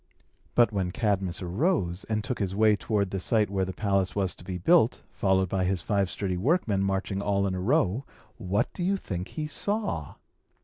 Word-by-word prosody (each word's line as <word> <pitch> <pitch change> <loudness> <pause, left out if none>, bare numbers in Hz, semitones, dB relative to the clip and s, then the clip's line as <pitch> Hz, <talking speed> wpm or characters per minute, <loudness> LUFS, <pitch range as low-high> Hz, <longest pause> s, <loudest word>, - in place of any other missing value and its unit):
But, 120 -1 +5
when 95 -4 -1
Cadmus 95 -3 -1
arose, 95 - 0
and 110 -1 -1
took 125 +2 -3
his 95 -2 -1
way 110 0 +5
toward 100 -2 -1
the 95 - -2
site 105 +1 +1
where 95 -1 0
the 95 - -4
palace 100 -2 0
was 95 -3 0
to - - -14
be 90 0 -4
built, 130 - +3
followed 95 -1 +2
by 95 +1 0
his 90 -2 -1
five 100 -1 +1
sturdy 95 -2 -2
workmen 110 - +1
marching 95 0 -1
all 100 -1 +1
in 95 - -1
a 95 - -3
row, 125 - +2 0.3
what 100 -1 -1
do - - -6
you 195 +3 +1
think 90 - -5
he 155 - -4
saw? 195 - -2
100 Hz, 195 wpm, -27 LUFS, 95-110 Hz, 0.3 s, But